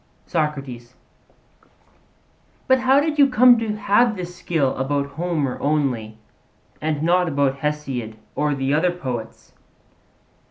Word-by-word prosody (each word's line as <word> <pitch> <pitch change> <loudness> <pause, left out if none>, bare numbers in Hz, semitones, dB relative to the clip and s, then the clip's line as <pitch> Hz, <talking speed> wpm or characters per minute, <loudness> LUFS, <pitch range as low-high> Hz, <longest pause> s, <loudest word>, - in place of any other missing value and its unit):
SOCRATES: 135 -7 -3 1.7
But 260 -1 +4
how 260 +2 +4
did 300 0 -1
you 280 -1 +6
come 250 -1 +6
to 220 -2 -2
have 215 +2 +2
this 180 -2 -7
skill 155 -7 -1
about 140 +2 -1
Homer 160 -6 -2
only, 130 -7 -1 0.6
and 155 -1 -1
not 180 +2 +3
about 140 -2 0
Hesiod 135 -7 -3 0.2
or 150 -1 0
the 135 +1 -1
other 170 +4 +2
poets? 125 -10 -7
150 Hz, 120 wpm, -22 LUFS, 135-185 Hz, 1.7 s, you